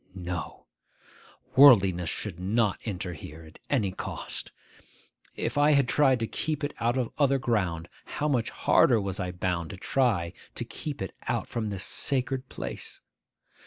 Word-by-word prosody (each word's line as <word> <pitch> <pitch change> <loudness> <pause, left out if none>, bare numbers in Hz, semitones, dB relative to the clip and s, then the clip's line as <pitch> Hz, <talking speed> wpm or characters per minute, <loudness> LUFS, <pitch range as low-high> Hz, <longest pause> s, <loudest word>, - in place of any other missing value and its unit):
No! 90 -4 -5 0.9
Worldliness 95 - +7
should 95 -5 -5
not 105 +2 +1
enter 90 -4 -3
here 80 +1 -10
at 80 -1 -15
any 110 -9 +1
cost. - - -5 0.8
If - - -1
I 150 +1 +5
had 140 -3 +4
tried 135 -3 +4
to - - +1
keep 155 +6 -3
it 145 - -2
out 120 +2 +1
of 125 -3 -1
other 140 -1 +4
ground, 90 -10 -1 0.3
how 150 - +1
much 125 -6 +1
harder 120 -4 +4
was 100 -2 -3
I 90 0 -2
bound 90 -2 -2
to 95 - -7
try 95 -7 +1 0.2
to 120 - -4
keep 140 0 -5
it 95 - -6
out - - -1
from 110 -2 -3
this 100 -1 -3
sacred 130 -1 -1
place! - - -5
110 Hz, 160 wpm, -28 LUFS, 90-130 Hz, 0.9 s, Worldliness